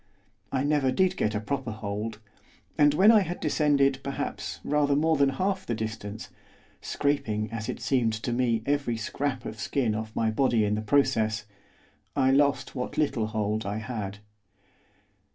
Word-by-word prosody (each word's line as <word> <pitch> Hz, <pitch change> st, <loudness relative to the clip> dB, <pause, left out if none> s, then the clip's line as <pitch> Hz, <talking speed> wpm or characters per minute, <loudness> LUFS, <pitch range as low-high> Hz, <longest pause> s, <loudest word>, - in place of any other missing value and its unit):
I 130 Hz, 0 st, 0 dB
never 145 Hz, -3 st, +2 dB
did 185 Hz, +7 st, +2 dB
get 105 Hz, -, 0 dB
a -, -, +1 dB
proper 130 Hz, +3 st, -3 dB
hold, 110 Hz, 0 st, -4 dB, 0.6 s
and 145 Hz, 0 st, +4 dB
when 200 Hz, +7 st, +7 dB
I 220 Hz, -, +7 dB
had 180 Hz, -3 st, -3 dB
descended, 140 Hz, -3 st, +2 dB
perhaps, 135 Hz, 0 st, -4 dB
rather 145 Hz, -1 st, +2 dB
more 160 Hz, +2 st, +3 dB
than 140 Hz, -2 st, +4 dB
half 190 Hz, +8 st, -1 dB
the 120 Hz, -, -2 dB
distance 110 Hz, -1 st, -5 dB, 0.5 s
scraping, 110 Hz, -7 st, -1 dB
as 110 Hz, -1 st, -4 dB
it -, -, -4 dB
seemed 120 Hz, -4 st, +1 dB
to 110 Hz, +2 st, -3 dB
me, 120 Hz, -2 st, +1 dB
every 140 Hz, -5 st, 0 dB
scrap 130 Hz, +3 st, -3 dB
of 110 Hz, 0 st, -6 dB
skin 120 Hz, -4 st, 0 dB
off 110 Hz, +1 st, -5 dB
my 110 Hz, -1 st, +1 dB
body 115 Hz, -2 st, +2 dB
in 105 Hz, -, 0 dB
the 105 Hz, -, -1 dB
process 110 Hz, -3 st, +1 dB, 0.7 s
I 130 Hz, -1 st, +3 dB
lost 140 Hz, +1 st, +2 dB
what 125 Hz, -2 st, -4 dB
little 120 Hz, -7 st, +1 dB
hold 110 Hz, 0 st, -1 dB
I 100 Hz, +1 st, -3 dB
had. 110 Hz, -3 st, -5 dB
125 Hz, 165 wpm, -27 LUFS, 110-140 Hz, 0.7 s, when